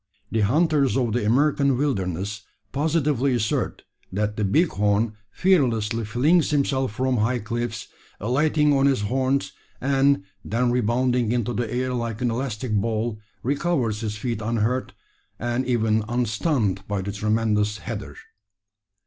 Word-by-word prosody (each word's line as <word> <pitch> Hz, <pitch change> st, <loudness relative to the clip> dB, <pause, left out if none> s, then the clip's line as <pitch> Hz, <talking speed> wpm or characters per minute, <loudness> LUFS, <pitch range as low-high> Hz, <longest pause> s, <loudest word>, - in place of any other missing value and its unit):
The 115 Hz, -, 0 dB
hunters 140 Hz, +5 st, +2 dB
of 120 Hz, -4 st, 0 dB
the 120 Hz, -1 st, 0 dB
American 140 Hz, +2 st, +3 dB
wilderness 100 Hz, -, -2 dB, 0.3 s
positively 145 Hz, -3 st, +1 dB
assert 110 Hz, -3 st, -1 dB, 0.3 s
that 105 Hz, +2 st, -1 dB
the 105 Hz, -, -1 dB
bighorn 105 Hz, -, +2 dB, 0.2 s
fearlessly 115 Hz, -, +1 dB
flings 145 Hz, +10 st, +3 dB
himself 135 Hz, -4 st, +1 dB
from 130 Hz, +2 st, 0 dB
high 115 Hz, +4 st, +1 dB
cliffs, 120 Hz, 0 st, -4 dB, 0.3 s
alighting 150 Hz, +6 st, +2 dB
on 135 Hz, 0 st, +4 dB
his 135 Hz, -6 st, +2 dB
horns; 130 Hz, +5 st, 0 dB, 0.3 s
and, 135 Hz, -3 st, +2 dB, 0.2 s
then 120 Hz, +2 st, 0 dB
rebounding 125 Hz, 0 st, +1 dB
into 120 Hz, -1 st, 0 dB
the 120 Hz, -2 st, -2 dB
air 125 Hz, +1 st, -1 dB
like 115 Hz, -3 st, -3 dB
an 125 Hz, -2 st, 0 dB
elastic 120 Hz, -1 st, -3 dB
ball, 110 Hz, +1 st, -1 dB, 0.2 s
recovers 130 Hz, -6 st, 0 dB
his 105 Hz, -2 st, -3 dB
feet 115 Hz, -1 st, -3 dB
unhurt, 115 Hz, +3 st, -1 dB, 0.4 s
and 120 Hz, +2 st, -2 dB
even 110 Hz, -3 st, +2 dB
unstunned 120 Hz, -, 0 dB
by 100 Hz, -2 st, -2 dB
the 100 Hz, -, -3 dB
tremendous 105 Hz, 0 st, 0 dB
"header!" 105 Hz, -9 st, -6 dB
120 Hz, 130 wpm, -24 LUFS, 105-135 Hz, 0.4 s, on